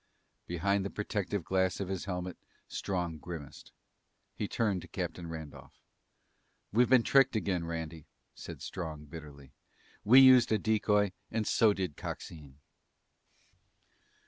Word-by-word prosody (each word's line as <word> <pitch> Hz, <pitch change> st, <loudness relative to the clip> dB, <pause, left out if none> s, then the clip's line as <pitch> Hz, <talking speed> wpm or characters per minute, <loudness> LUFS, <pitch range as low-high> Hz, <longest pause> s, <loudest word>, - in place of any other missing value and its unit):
Behind 100 Hz, +3 st, 0 dB
the 100 Hz, -, -3 dB
protective 100 Hz, -2 st, -3 dB
glass 95 Hz, 0 st, 0 dB
of 100 Hz, -, -3 dB
his 95 Hz, -1 st, -4 dB
helmet, 90 Hz, -2 st, -4 dB, 0.3 s
Strong 90 Hz, -5 st, -3 dB
grimaced. 80 Hz, -4 st, -9 dB, 0.6 s
He 105 Hz, -, -3 dB
turned 105 Hz, -6 st, 0 dB
to -, -, -11 dB
Captain 85 Hz, -2 st, -5 dB
Randolph. 80 Hz, -3 st, -9 dB, 0.9 s
"We've 120 Hz, +3 st, +4 dB
been 130 Hz, -2 st, +6 dB
tricked 135 Hz, -1 st, +4 dB
again, 95 Hz, -5 st, -1 dB
Randy," 80 Hz, -2 st, -6 dB, 0.3 s
said -, -, -9 dB
Strong 80 Hz, -5 st, -6 dB
bitterly. 70 Hz, -4 st, -11 dB, 0.5 s
"We 125 Hz, +6 st, +8 dB
used 130 Hz, -3 st, +7 dB
a 110 Hz, -, +4 dB
decoy 105 Hz, -1 st, +2 dB, 0.2 s
and 110 Hz, -1 st, -1 dB
so 110 Hz, 0 st, +4 dB
did 90 Hz, -7 st, -4 dB
Coxine!" 70 Hz, -4 st, -8 dB
95 Hz, 125 wpm, -31 LUFS, 80-105 Hz, 0.9 s, We